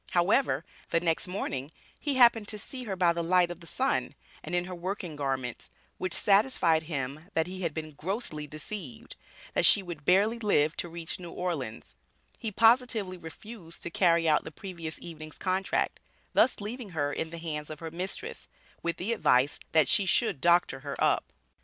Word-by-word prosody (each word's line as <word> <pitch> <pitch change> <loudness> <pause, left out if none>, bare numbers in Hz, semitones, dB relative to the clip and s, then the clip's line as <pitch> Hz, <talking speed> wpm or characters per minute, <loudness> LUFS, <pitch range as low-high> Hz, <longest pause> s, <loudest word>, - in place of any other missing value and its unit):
However, 175 - +3 0.2
the 165 - +3
next 165 +1 0
morning, 145 -7 -3 0.3
he 290 -3 0
happened 235 -4 +6
to 210 - -2
see 250 +4 -5
her 200 -4 -3
by 175 -2 +3
the 170 - -2
light 175 0 +3
of 175 - -7
the 170 - -13
sun, 265 +8 0 0.3
and - - -3
in 175 0 +1
her 185 - -6
working 180 -2 -4
garments, 135 -4 -3 0.3
which 185 -1 0
satisfied 195 -6 +4
him 145 +3 -4
that 160 - +3
he 185 +2 -6
had 170 -3 0
been 155 0 -5
grossly 155 - -4
deceived; 155 - -7 0.4
that - - +2
she 200 - +6
would 170 -5 -7
barely 205 +8 +4
live 155 -8 +2
to 175 - -3
reach 165 0 -5
New 175 -1 -7
Orleans; 135 - -4 0.4
he 220 - -2
positively 225 -3 +3
refused 170 +2 -10
to 170 - -4
carry 170 -2 +3
out 155 - +4
the - - -6
previous 170 -2 -7
evening's 155 -2 -9
contract, 190 +1 0 0.3
thus 260 - +4
leaving 220 +2 -5
her 145 -1 +1
in 160 - -2
the 170 - -7
hands 155 -3 -4
of 155 -1 -7
her 165 -1 -6
mistress, 180 +3 -5 0.3
with 170 -1 -2
the 210 +6 -1
advice, 135 - +3
that 160 -1 +5
she 200 - +3
should 195 - +2
"doctor 170 -5 +4
her - - -5
up." - - +1
175 Hz, 185 wpm, -29 LUFS, 155-200 Hz, 0.4 s, happened